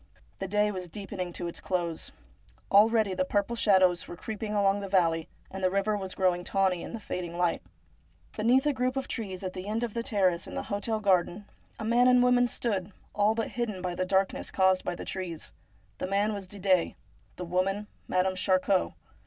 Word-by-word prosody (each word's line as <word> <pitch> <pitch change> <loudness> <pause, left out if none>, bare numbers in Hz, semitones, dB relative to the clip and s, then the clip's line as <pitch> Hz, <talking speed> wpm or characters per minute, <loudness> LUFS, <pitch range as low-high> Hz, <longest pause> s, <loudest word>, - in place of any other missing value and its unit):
The 195 - -3
day 210 +2 +2
was 185 -3 -6
deepening 185 -1 -5
to 175 - -4
its 170 - -6
close. 170 -3 -3 0.6
Already 215 0 +5
the 185 0 +1
purple 205 +4 0
shadows 190 -6 +3
were - - -7
creeping 215 +3 -5
along 200 0 +3
the 200 - -5
valley, 165 -4 +2 0.2
and 190 0 -6
the 185 - +4
river 200 +3 +1
was 190 -2 -5
growing 180 -2 +1
tawny 190 -2 +1
in - - -7
the 230 - -4
fading 175 -4 -5
light. 175 -1 +1 0.7
Beneath 245 +5 +3
a 295 - +2
group 255 0 -1
of 270 - -2
trees 195 -5 -4
at 185 -1 -4
the 185 +1 -7
end 220 +3 -1
of 230 -3 -3
the 235 - -1
terrace 185 -6 +1
in - - -8
the - - -2
hotel 215 +2 -1
garden, 195 -1 +1 0.3
a 220 - -4
man 240 +2 +4
and 250 0 +6
a - - +5
woman 250 0 +4
stood, 205 -6 -2 0.2
all 210 +2 +2
but 225 - -2
hidden 230 -5 -3
by 180 -1 -3
the 185 - -1
darkness 190 +1 0
caused 190 -1 +3
by 175 - -2
the - - -7
trees. 180 -4 -5 0.5
The - - -2
man 200 +3 +1
was 200 -2 -6
Didet; 185 -2 +1 0.4
the 180 - -6
woman 190 +4 0 0.2
Madame 185 +1 +1
Charcot. 185 0 +2
195 Hz, 200 wpm, -28 LUFS, 185-215 Hz, 0.7 s, and